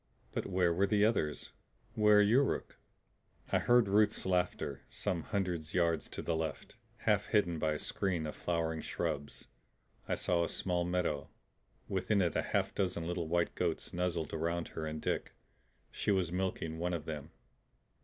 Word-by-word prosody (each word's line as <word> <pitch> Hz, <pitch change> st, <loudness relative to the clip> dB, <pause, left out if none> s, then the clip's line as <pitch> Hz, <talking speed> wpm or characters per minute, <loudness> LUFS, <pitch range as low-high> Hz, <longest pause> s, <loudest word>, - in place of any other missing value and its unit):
But -, -, -3 dB
where 90 Hz, -3 st, +2 dB
were 95 Hz, +4 st, +2 dB
the 105 Hz, 0 st, +4 dB
others? 85 Hz, -10 st, 0 dB, 0.4 s
Where 105 Hz, -2 st, +6 dB
Yuruk? 125 Hz, +7 st, +2 dB, 0.8 s
I -, -, +4 dB
heard 120 Hz, -2 st, +4 dB
Ruth's 105 Hz, +2 st, +3 dB
laughter. 90 Hz, -1 st, 0 dB
Some 85 Hz, -3 st, -2 dB
hundred 90 Hz, -5 st, -2 dB
yards 85 Hz, -2 st, +2 dB
to -, -, -5 dB
the 85 Hz, -, 0 dB
left, 80 Hz, -2 st, -4 dB, 0.3 s
half -, -, +2 dB
hidden 90 Hz, -6 st, +2 dB
by 80 Hz, 0 st, +1 dB
a -, -, -2 dB
screen 90 Hz, 0 st, -1 dB
of 75 Hz, -, -5 dB
flowering 80 Hz, -2 st, -1 dB
shrubs, 70 Hz, 0 st, -3 dB, 0.6 s
I -, -, +1 dB
saw 85 Hz, -1 st, +1 dB
a -, -, -1 dB
small 90 Hz, -2 st, 0 dB
meadow. 85 Hz, -5 st, -1 dB, 0.6 s
Within 100 Hz, +2 st, +1 dB
it 90 Hz, -3 st, +1 dB
a -, -, +3 dB
half -, -, 0 dB
dozen 90 Hz, -4 st, -1 dB
little 85 Hz, -1 st, -2 dB
white 85 Hz, +1 st, +1 dB
goats -, -, -2 dB
nuzzled 85 Hz, -3 st, -1 dB
around 85 Hz, +1 st, -1 dB
her 80 Hz, -1 st, -4 dB
and 75 Hz, 0 st, -4 dB
Dick. -, -, -2 dB, 0.6 s
She -, -, -2 dB
was 95 Hz, -4 st, +2 dB
milking 90 Hz, -3 st, -2 dB
one 90 Hz, +1 st, 0 dB
of 80 Hz, -2 st, -5 dB
them. 75 Hz, -2 st, -5 dB
85 Hz, 165 wpm, -33 LUFS, 80-95 Hz, 0.8 s, Where